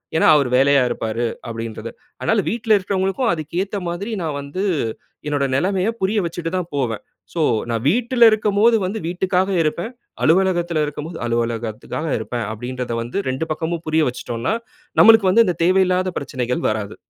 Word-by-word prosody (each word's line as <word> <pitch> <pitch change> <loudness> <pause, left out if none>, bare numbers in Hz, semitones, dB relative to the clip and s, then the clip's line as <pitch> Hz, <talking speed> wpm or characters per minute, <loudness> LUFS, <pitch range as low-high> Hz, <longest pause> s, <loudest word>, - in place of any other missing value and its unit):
ஏன்னா, 160 - +4
அவரு 140 -4 +2
வேலையா 140 +1 +5
இருப்பாரு 115 +1 -2 0.3
அப்டின்றத. 115 -1 -5 0.3
அதனால 220 -2 +2
வீட்ல 225 -1 +2
இருக்கிறவங்ககளுக்கும் 195 +5 0
அதுக்கு 160 +1 -4
ஏத்த 200 +1 -5
மாதிரி 190 +6 -4
நா - - -1
வந்து 140 +7 -4 0.6
என்னோட 145 -2 0
நெலமைய 190 +6 +1
புரிய 205 +3 +1
வச்சுட்டு 165 0 -4
தான் 175 -2 -3
போவேன். 120 -6 -2 0.3
ஸோ 170 - -1 0.3
நான் 115 -1 -1
வீட்ல 240 - +4
இருக்கும்போது 215 +1 +3
வந்து 200 +4 -3
வீட்டுக்காக 185 +2 0
இருப்பேன். 165 +7 -1 0.3
அலுவலகத்தில 175 -2 +2
இருக்கும்போது 150 +3 -6
அலுவலகத்துக்காக 115 +5 -2
இருப்பேன் 115 +1 -3
அப்டின்றத 125 +2 -4
வந்து 120 +9 -5
2 130 +5 -2
பக்கமும் 160 +2 -3
புரிய 155 0 +2
வச்சுட்டோம்னா, 120 - -3 0.5
நம்மளுக்கு 220 -4 +7
வந்து 230 +4 +5
இந்த 180 - 0
தேவையில்லாத 185 0 +2
பிரச்சனைகள் 125 -3 -3
வராது. 110 -2 -3
165 Hz, 145 wpm, -20 LUFS, 125-190 Hz, 0.6 s, நம்மளுக்கு